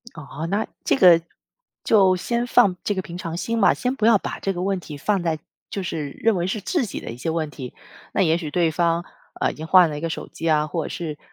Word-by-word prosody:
哦， 150 +1 -6
那 205 +3 0 0.2
这 - - +3
个 180 -8 +7 0.6
就 190 -4 +5
先 235 +6 -1
放 220 -7 +4
这 205 - 0
个 190 - -2
平 175 -1 -8
常 170 -2 -5
心 230 +5 -2
吧， - - +6
先 250 +1 -2
不 220 - -2
要 225 -3 +6
把 - - -5
这 195 - -1
个 180 -1 -4
问 195 0 0
题 155 -4 -9
放 195 +5 0
在 165 -2 -1 0.3
就 195 - -3
是 155 -5 -4
认 225 +4 +1
为 175 - -1
是 200 +3 -2
自己 250 - -2
的 - - -7
一 115 - -8
些 160 +6 -3
问 160 -2 -2
题， 130 -4 -8 0.4
那 - - 0
也 165 -1 +3
许 160 -4 -5
对 170 +1 +2
方， 170 +1 +1 0.4
呃， - - +1
已 - - -11
经 160 +1 -7
换 180 -1 +6
了 150 - -4
一 - - -5
个 165 +1 -3
手 - - -5
机 165 - -4
啊， 150 -1 +3
或 160 +1 -3
者 - - -4
是， 155 -4 -5
175 Hz, 280 characters per minute, -23 LUFS, 160-200 Hz, 0.6 s, 个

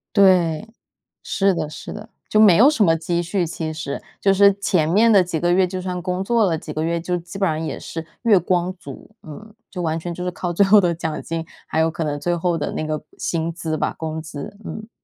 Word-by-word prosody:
对， 185 -2 +4 0.6
是 195 -1 +1
的 155 -3 -2
是 150 - -8
的， 210 +1 -9 0.2
就 215 - +2
没 205 -6 +7
有 260 +6 +7
什 245 -9 +2
么 165 - +4
积 170 +1 -1
蓄 175 +1 -1
其 160 -1 -4
实。 155 -3 -5 0.2
就 195 - +4
是 200 +1 +6
前 180 -5 +1
面 215 +7 +4
的 195 -4 +6
几 170 -3 -3
个 175 0 +2
月 185 +1 +4
就 185 0 -5
算 180 -1 -4
工 180 +1 -2
作 230 +2 +2
了 170 -5 +1
几 150 - -8
个 155 +1 -2
月， 170 0 0
就 180 +1 -2
基 175 +3 -9
本 195 -2 +2
上 155 0 -1
也 155 -3 -4
是 165 0 -6 0.2
月 220 -5 +5
光 180 +1 0
族， 140 +3 -11
嗯， 210 +8 -11 0.2
就 180 - -6
完 160 -1 -1
全 175 +1 -5
就 180 - -6
是 180 - -1
靠 175 0 -4
最 200 +4 +4
后 205 +1 +7
的 175 -2 +1
奖 160 -2 -4
金， 165 0 -4 0.2
还 160 - -1
有 160 - +3
可 165 0 -4
能 145 -1 -2
最 175 +2 0
后 170 0 0
的 - - -3
那 155 - -3
个 155 -1 -3 0.2
薪 165 0 -2
资 160 -1 -3
吧， - - -1
工 160 0 -4
资， 155 +3 -8
嗯。 215 +1 -7
175 Hz, 265 characters per minute, -21 LUFS, 160-195 Hz, 0.6 s, 没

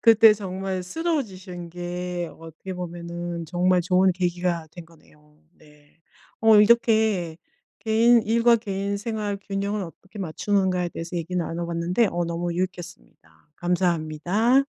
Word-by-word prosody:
그때 225 -1 +7
정말 190 -2 -4
쓰러지신 190 - -4
게 175 0 -4
어떻게 165 +3 -9
보면은 175 -1 -5
정말 180 +2 +2
좋은 185 +1 +3
계기가 175 -2 -1
된 175 0 -10
거네요. 150 -2 -23 0.2
네. 150 0 -23 0.4
어 220 -1 +6
이렇게 215 -6 +3 0.4
개인 230 +1 +4
일과 235 +2 +4
개인 200 -2 -3
생활 210 -1 -3
균형을 200 +1 -3
어떻게 190 +4 -11
맞추는가에 185 0 0
대해서 170 +2 -6
얘기 175 +2 -3
나눠봤는데 170 +4 0
어 175 0 -1
너무 170 +1 -2
유익했습니다. 170 - -7
감사합니다. 180 - +1
180 Hz, 300 characters per minute, -24 LUFS, 170-205 Hz, 0.4 s, 그때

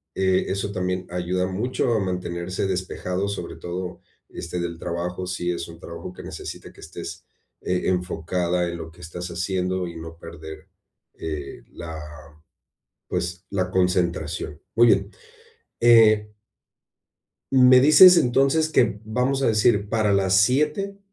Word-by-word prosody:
eh, 95 -1 +2
eso 100 +1 -2
también 90 -1 -2
ayuda 90 +1 -1
mucho 115 +5 -1
a 110 - +2
mantenerse 90 0 -3
despejado, 95 +1 -2
sobre 100 - -5
todo, 90 +1 -6 0.3
este, 85 +1 -6
del 85 -1 -4
trabajo, 90 +2 -4
si 90 -1 -2
es 85 -1 -4
un 85 0 -12
trabajo 85 +1 -8
que - - -11
necesita - - -8
que - - -16
estés, 85 +1 -8 0.4
eh, 90 0 -1
enfocada 90 -1 -1
en 85 0 -4
lo 80 -1 -8
que 90 - -17
estás 90 +1 -7
haciendo 90 +1 -2
y 85 - -9
no 80 0 -9
perder, 80 -2 -10 0.5
eh, 75 -3 -6
la, 80 -1 -7 1.1
pues, 90 +1 -3
la 95 -2 -1
concentración. 85 -4 -1 0.2
Muy 120 +1 +6
bien, - - +3 0.7
eh 110 -3 +5 1.2
¿Me 130 -1 +7
dices 175 +7 +9
entonces 135 +4 +3
que, 115 -8 +2
vamos 125 +5 0
a - - +2
decir, 105 -2 +2
para 110 -2 +1
las 95 -1 +2
19:00 150 - +1
90 Hz, 140 wpm, -23 LUFS, 85-110 Hz, 1.2 s, dices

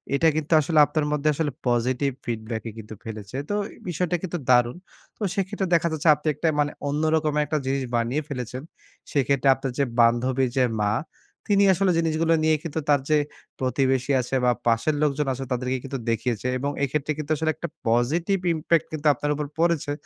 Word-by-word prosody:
এটা 165 +3 +3
কিন্তু 155 +1 -1
আসলে 155 +1 +2
আপনার 155 -1 -1
মধ্যে 150 0 +1
আসলে 150 -2 -1 0.2
পজিটিভ 125 +3 +1
ফিডব্যাকই 115 -1 -4
কিন্তু 110 0 -9
ফেলেছে। 110 +2 -7
তো 205 - 0 0.2
এ - - -19
বিষয়টা 175 +1 -1
কিন্তু 175 -1 -3
দারুণ! 120 +4 +4 0.4
তো - - -26
সেক্ষেত্রে 195 0 -1
দেখা 170 0 +2
যাচ্ছে 160 +1 +1
আপনি 150 +2 -8
একটা 155 +3 -2
মানে 145 0 0 0.2
অন্য 150 +2 -1
রকম 155 -1 0
একটা 155 - -1
জিনিস 135 0 0
বানিয়ে 120 +6 0
ফেলেছেন। 125 0 -5 0.5
সেক্ষেত্রে 140 -1 +2
আপনার 135 -1 -4
যে - - +4 0.2
বান্ধবীর 125 +3 +3
যে 130 - +5 0.2
মা 105 0 +2 0.5
তিনি 200 -1 +4
আসলে 185 0 +2
জিনিসগুলো 165 0 +1
নিয়ে 155 0 +4
কিন্তু 160 -1 -3
তার 145 -2 +4
যে 155 - +5 0.4
প্রতিবেশী 130 +1 +1
আছে 125 +2 -3
বা 125 - +5 0.2
পাশের 115 +7 +2
লোকজন 145 0 0
আছে 135 +1 -5
তাদেরকে 125 +1 -1
কিন্তু 135 0 -4
দেখিয়েছে 115 +1 -1
এবং 140 +2 -2
এক্ষেত্রে 140 +2 -1
কিন্তু 155 0 -5
আসলে 160 +1 0
একটা 165 +2 -5 0.2
পজিটিভ 155 - +2 0.2
ইমপ্যাক্ট 160 0 +1
কিন্তু 155 0 -1
আপনার 145 +3 -2
উপর 150 0 -3
পড়েছে। 165 -4 +1
145 Hz, 185 wpm, -24 LUFS, 125-160 Hz, 0.5 s, যে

